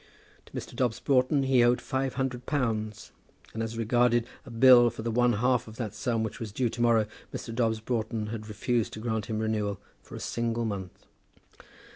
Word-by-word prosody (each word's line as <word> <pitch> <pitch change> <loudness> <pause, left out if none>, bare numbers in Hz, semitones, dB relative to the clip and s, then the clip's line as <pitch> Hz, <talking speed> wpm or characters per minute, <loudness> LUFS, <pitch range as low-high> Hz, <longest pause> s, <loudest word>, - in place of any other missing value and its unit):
To - - -19
Mr. - - -6
Dobbs 120 -3 0
Broughton 135 +1 +2
he 130 -2 +4
owed 120 +1 +4
five 135 -1 -2
hundred 125 -2 -3
pounds; 110 -7 -2 0.4
and 110 - -3
as 115 0 -4
regarded 120 +1 +2 0.2
a - - -8
bill 120 0 +7
for 115 -1 -8
the 115 - -1
one 120 +1 +3
half 125 +2 +1
of 110 - -10
that 115 -4 -4
sum 110 +1 -1
which 110 - -5
was 115 -4 -5
due 120 +3 0
to 120 - -5
morrow, 115 -2 +4 0.3
Mr. 115 - -6
Dobbs 115 -2 0
Broughton 110 -2 -2
had 110 -2 -6
refused 115 +2 -1
to - - -6
grant 110 -2 -2
him 110 - -2
renewal 105 -2 -1 0.2
for - - -12
a - - -6
single 115 0 -2
month! 95 -4 -6
115 Hz, 195 wpm, -28 LUFS, 110-125 Hz, 0.4 s, bill